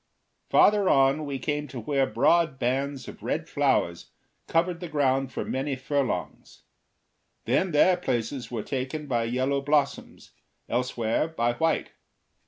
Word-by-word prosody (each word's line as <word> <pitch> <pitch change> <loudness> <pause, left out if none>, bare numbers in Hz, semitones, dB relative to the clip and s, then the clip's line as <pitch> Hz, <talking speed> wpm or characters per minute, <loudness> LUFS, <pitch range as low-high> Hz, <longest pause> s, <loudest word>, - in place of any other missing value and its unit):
Farther 205 -2 +5
on 135 +2 +3
we 140 -1 -3
came 150 +2 -2
to 130 -2 -7
where 135 +3 0
broad 165 -5 +2
bands 135 +2 -2
of - - -10
red - - -2
flowers 85 0 0 0.4
covered 170 +1 +1
the 175 - -6
ground 135 -3 +1
for - - -4
many 135 +1 -2
furlongs; 135 0 -3 0.8
then 190 - +1
their 175 +3 +4
places 125 -4 -3
were 115 -4 -4
taken 135 +3 -4
by 120 -4 0
yellow 130 +4 0
blossoms, 145 0 -1 0.4
elsewhere 120 +2 0
by 120 -7 0
white. 160 +6 0
135 Hz, 135 wpm, -26 LUFS, 125-150 Hz, 0.8 s, Farther